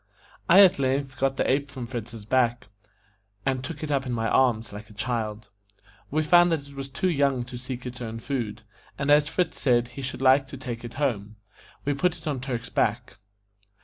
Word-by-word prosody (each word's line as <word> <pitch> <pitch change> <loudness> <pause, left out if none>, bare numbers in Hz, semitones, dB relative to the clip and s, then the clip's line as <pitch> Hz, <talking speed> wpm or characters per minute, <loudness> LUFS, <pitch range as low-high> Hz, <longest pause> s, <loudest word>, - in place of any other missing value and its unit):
I 190 +3 +9
at 185 -4 +5
length 135 0 -1
got 135 0 +1
the - - +1
ape 140 +2 +1
from 130 -3 -6
Fritz's 115 -3 -7
back, 120 -2 +1 0.8
and 130 -1 0
took 150 +3 -6
it 150 - -3
up 135 -2 0
in - - -2
my 115 -1 0
arms 115 -5 +2
like 105 +2 -9
a 105 - -15
child. 110 -2 -3 0.6
We 155 +2 +1
found 175 +2 +6
that 145 -4 -1
it 140 - -13
was 135 0 -6
too 185 - -1
young 140 -6 +2
to 125 0 -8
seek 125 0 -6
its 125 0 -7
own 115 -1 -5
food, 115 -3 -4 0.3
and, 140 0 +1
as 150 0 +5
Fritz 180 +2 -1
said 120 -3 +3
he 125 +3 -8
should 130 0 -4
like 135 +1 +5
to 135 - -8
take 120 -2 -6
it 120 -1 -8
home, 110 -7 -1 0.5
we 145 - +1
put 175 +5 +1
it 160 - -14
on 140 -5 -2
Turk's 125 -2 -4
back. 120 +4 0
130 Hz, 210 wpm, -26 LUFS, 120-140 Hz, 0.8 s, I